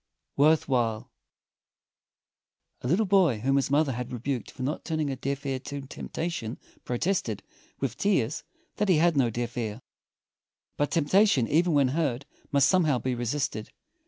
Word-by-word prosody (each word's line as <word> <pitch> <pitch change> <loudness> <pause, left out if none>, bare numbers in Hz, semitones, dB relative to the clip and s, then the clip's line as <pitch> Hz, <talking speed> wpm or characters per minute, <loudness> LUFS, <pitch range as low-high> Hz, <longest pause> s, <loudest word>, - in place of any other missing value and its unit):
_ - - -57 0.3
WORTH 155 +3 +4
WHILE 120 -2 0 1.7
A - - -4
little 185 - +2
boy 185 - +4
whom 135 +3 +2
his 140 -1 +1
mother 145 0 +3
had 125 0 -5
rebuked 125 +1 -3
for 130 - -7
not 140 +4 -2
turning 155 -3 -1
a - - -2
deaf 140 +2 -4
ear 135 -1 -1
to 140 +2 -6
temptation 135 -2 -5 0.3
protested, 125 - -1 0.4
with 130 -3 -2
tears, 155 - +1 0.3
that 210 -1 0
he 180 - +5
had 170 +1 +3
no 130 -4 +3
deaf 120 +1 -4
ear. 110 -2 -3 1.0
But 145 - 0
temptation, 165 - +3
even 170 +5 +2
when 140 -3 +4
heard, 140 -3 -1 0.3
must 140 -1 +4
somehow 155 -7 +3
be 130 +1 -2
resisted. 120 -2 -2
140 Hz, 160 wpm, -27 LUFS, 125-160 Hz, 1.7 s, he